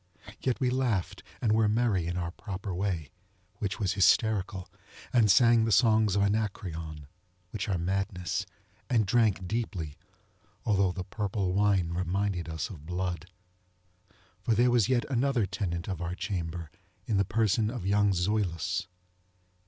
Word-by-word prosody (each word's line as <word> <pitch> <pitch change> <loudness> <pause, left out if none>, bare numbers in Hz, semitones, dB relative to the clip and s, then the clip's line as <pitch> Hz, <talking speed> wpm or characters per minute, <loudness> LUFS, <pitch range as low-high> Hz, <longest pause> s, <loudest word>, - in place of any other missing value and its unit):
Yet 130 -2 -1
we 125 -2 +1
laughed 125 -8 -1 0.2
and 110 - +3
were 110 0 +4
merry 105 -6 +1
in 90 +1 -2
our 85 -1 -2
proper 100 0 -6
wayŌĆöwhich 95 +3 -5
was 100 -3 0
hysterical; 100 -2 +2 0.5
and 115 -4 +5
sang 115 +3 +6
the 115 - 0
songs 110 -2 +4
of 100 - +3
AnacreonŌĆöwhich 90 -2 -4
are 95 - +1
madness; 90 0 -2 0.4
and 115 -4 +3
drank 105 -2 +2
deeplyŌĆöalthough 95 0 -3
the 90 -1 -4
purple 100 -2 -2
wine 100 -3 +2
reminded 90 0 -1
us 80 +3 -3
of 80 -5 -11
blood. 90 -1 -3 1.1
For 115 - +1
there 120 +3 +4
was 120 -2 +3
yet 125 -2 +2
another 130 -3 +1
tenant 90 -3 -3
of 95 -4 -4
our 85 +1 -3
chamber 85 -4 -4 0.3
in 110 - 0
the 100 - +4
person 110 +1 +1
of 120 -6 -5
young 100 +1 +3
Zoilus. 90 -3 0
100 Hz, 135 wpm, -29 LUFS, 90-110 Hz, 1.1 s, sang